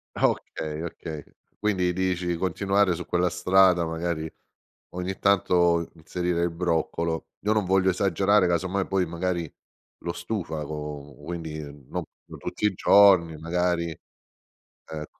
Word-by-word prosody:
Okay, 75 0 -1
okay. 80 -3 -6 0.3
Quindi, 95 -4 +1
dici 90 -1 -1
continuare 95 +2 +1
su 85 +1 -5
quella 90 0 +2
strada, 95 -2 +4
magari 80 -1 -3 0.6
ogni 90 +1 -4
tanto 85 -4 +3
inserire 85 +1 -2
il 85 - +2
broccolo. 85 -1 -1
Io 105 +2 +2
non 105 -3 +1
voglio 95 0 +3
esagerare, 95 +1 +3
casomai 95 +3 0
poi 95 -2 +1
magari 85 -1 -3 0.5
lo 85 - -3
stufa 85 -7 -4
co 75 -1 -6
quindi, 80 -3 -5
non 70 -3 -7 0.2
no - - -11
tutti - - -3
i 105 - +3
giorni, 90 -5 +5
magari, 85 +1 0 1.0
ecco, 75 -1 -8
85 Hz, 125 wpm, -26 LUFS, 80-95 Hz, 1.0 s, giorni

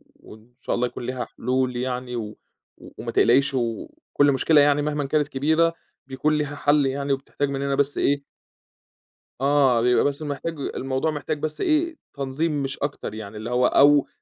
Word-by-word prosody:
وإن 110 +3 -16
شاء - - -1
الله 125 +1 0
يكون 120 - -8
ليها 125 -1 -3
حلول 125 +1 -2
يعني، 125 0 -3
و 105 -2 -5 0.6
وما - - -5
تقلقيش، 135 +3 +3
وكُلّ 125 +4 0
مشكلة 145 +2 +4
يعني 145 0 +3
مهمًا 145 -1 -1
كانت 150 +1 +1
كبيرة 160 +4 +2 0.3
بيكون 150 +3 0
ليها 145 -1 -2
حل 145 0 +2
يعني، 140 +1 -1
وبتحتاج 140 +1 -3
مننا 140 0 -1
بس 140 0 0
إيه 140 0 +1 1.2
آه، 135 -4 +3
بيبقى 125 +1 +3
بس 145 +1 -1
محتاج 145 +2 -4
الموضوع 135 +3 -2
محتاج 150 +1 -4
بس 155 0 -4
إيه 320 +1 +1 0.2
تنظيم 140 +2 -2
مش 135 +1 -4
أكتر 140 -6 -4
يعني، 105 -1 -8
اللي 110 +3 -6
هو 125 +1 +2
أو 145 0 +5
140 Hz, 165 wpm, -24 LUFS, 125-145 Hz, 1.2 s, أو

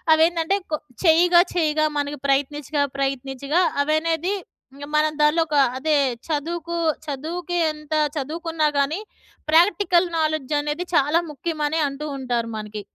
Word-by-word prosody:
అవేంటంటే 330 +3 +2 0.2
కొ - - +2 0.3
చెయ్యగా 345 +2 +6
చెయ్యగా 310 -2 +2
మనకి 290 +1 -3
ప్రయత్నించగా 285 +1 0 0.2
ప్రయత్నించగా 275 +4 -1 0.2
అవనేది, 325 +4 0 0.4
ఇంక 285 +1 -8
మనం 305 0 +3
దాంట్లో 300 +3 +4
ఒక 300 - -2 0.2
అదే 305 +3 +1 0.3
చదువుకు 335 +2 -3 0.3
చదువుకి 335 +5 -4
ఎంత 305 0 -8 0.2
చదువుకున్నా 315 +2 -1
కానీ 280 +6 +1 0.5
ప్రాక్టికల్ 350 +1 +4
నాలెడ్జ్ 310 -3 -1
అనేది 295 +4 -2
చాలా 300 +1 +3
ముఖ్యమని 305 +1 -2
అంటూ 275 +2 -6
ఉంటారు 245 -3 -2
మనకి. 210 0 -6
310 Hz, 120 wpm, -22 LUFS, 285-330 Hz, 0.5 s, చెయ్యగా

